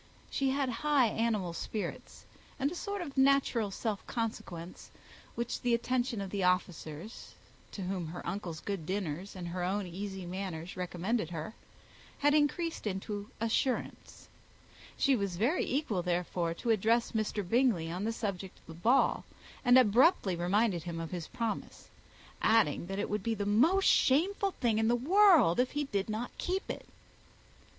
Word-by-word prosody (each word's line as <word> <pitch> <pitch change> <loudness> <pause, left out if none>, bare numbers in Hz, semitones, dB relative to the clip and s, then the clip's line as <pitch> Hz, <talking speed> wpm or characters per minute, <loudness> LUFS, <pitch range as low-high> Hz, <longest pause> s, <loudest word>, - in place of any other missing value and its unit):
She 270 -1 +1
had 275 0 0
high 290 -6 +4
animal 215 -6 -1
spirits, 210 +4 -5 0.3
and 280 +2 0
a - - -6
sort 400 +1 -3
of 285 -5 -8
natural 265 -5 +3
self 205 +1 -3
consequence, 185 -7 -5 0.5
which 235 0 -3
the 240 -1 +3
attentions 240 -2 -1
of 190 - -7
the 200 - -2
officers, 180 0 -2 0.4
to 195 - -5
whom 180 -2 -3
her 170 +3 -7
uncle's 175 -6 -4
good 195 -6 -4
dinners 190 -1 -3
and 175 -2 -5
her 180 +1 -3
own 195 +2 -1
easy 190 +1 -6
manners 180 -2 -5
recommended 180 +2 -2
her, 165 +4 -5 0.6
had 290 +1 +3
increased 305 -1 +1
into 205 +1 -4
assurance. 230 +4 -2 0.7
She 275 -2 +3
was 200 -6 -2
very 250 - +1
equal, 250 - 0
therefore, 175 -1 -1
to 230 - -1
address 225 +3 +2
Mr. 215 -3 -2
Bingley 225 -8 +2
on 180 +3 -3
the 225 - 0
subject 195 -5 -4
of - - -24
the 165 - -10
ball, 230 +11 +2 0.4
and 245 0 +6
abruptly 240 - +4
reminded 180 +2 +1
him 170 -1 -5
of 165 -1 -5
his 175 -3 -4
promise; 230 -2 -4 0.5
adding, 210 -7 +3
that 195 +1 -4
it - - -1
would 210 0 -2
be 225 +3 -1
the 205 -1 -3
most 310 - +4
shameful 380 +9 +3
thing 225 -4 +1
in 220 - +2
the 240 - +4
world 325 - +5
if 250 0 +1
he 290 0 0
did 200 -7 -2
not 220 +3 -4
keep 375 +2 -2
it. - - -8
210 Hz, 160 wpm, -31 LUFS, 180-250 Hz, 0.7 s, and